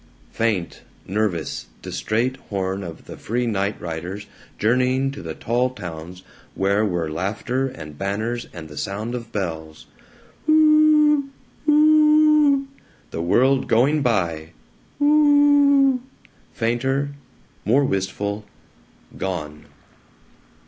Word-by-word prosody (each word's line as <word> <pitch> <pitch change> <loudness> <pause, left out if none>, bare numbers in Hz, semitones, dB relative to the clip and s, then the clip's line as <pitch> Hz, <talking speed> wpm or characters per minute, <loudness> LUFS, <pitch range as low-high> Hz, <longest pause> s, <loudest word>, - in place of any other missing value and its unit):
Uuuuuuu! - - -30
faint, 105 -7 -1 0.2
nervous, 95 - -2 0.2
distrait, 120 +4 -1
horn 95 -1 -2
of 85 -3 -9
the - - -9
free 120 +3 -2
night 100 -2 -1
riders 90 +5 -6 0.3
journeying 130 +4 +1
to 140 +1 -9
the - - -6
tall 120 +2 0
towns 90 -5 -9 0.3
where 100 +2 +1
were 90 -6 -1
laughter 110 +10 -2
and 75 - -10
banners 110 +5 -3
and 80 -3 -9
the 75 -1 -12
sound 100 - -4
of 120 -2 -6
bells 80 -5 -5 0.6
Uuuuu! 305 -2 +5 0.4
Uuuuu! 305 -1 +5 0.5
the 80 - -4
world 130 +10 +2
going 140 +7 +3
by 85 - -1 0.5
Uuuuuuu! 290 -2 +5 0.5
fainter, 135 +5 -1 0.5
more 130 +7 +3
wistful, 100 0 -2 0.8
gone. 75 -6 -5
115 Hz, 105 wpm, -22 LUFS, 95-145 Hz, 0.8 s, Uuuuu